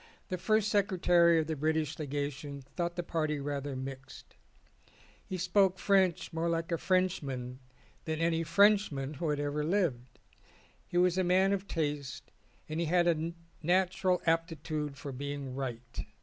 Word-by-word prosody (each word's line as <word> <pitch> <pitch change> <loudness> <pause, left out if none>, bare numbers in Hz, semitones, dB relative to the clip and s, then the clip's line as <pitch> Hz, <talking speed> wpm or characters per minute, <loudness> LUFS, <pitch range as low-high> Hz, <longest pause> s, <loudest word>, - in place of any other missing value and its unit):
The 185 - -3
first 215 +2 +2
secretary 180 -5 +4
of 160 - +2
the 160 0 -2
British 155 +1 -1
Legation 145 -1 -4
thought 175 -1 -1
the 175 - -2
party 155 -3 -1
rather 140 -1 -3
mixed. 130 0 -8 0.9
He 185 - -3
spoke 185 +1 +3
French 190 -4 +2
more 165 +1 0
like 165 0 -1
a 165 - 0
Frenchman 140 -10 -1 0.5
than 160 -1 -2
any 165 0 +1
French 200 +4 +4
man 135 +1 -4
who 155 +1 -2
ever 145 0 -1
lived. 150 -9 -1 0.7
He 175 - -2
was 180 +1 +3
a - - +3
man 190 +2 +3
of 200 0 -3
taste, 145 -5 -3 0.4
and 155 +1 -3
he 170 - 0
had 175 +1 +3
a 165 0 +1 0.3
natural 185 +2 +2
aptitude 160 -3 -1
for 145 -1 -6
being 140 0 -5
right. 125 -3 -5
165 Hz, 150 wpm, -31 LUFS, 145-180 Hz, 0.9 s, secretary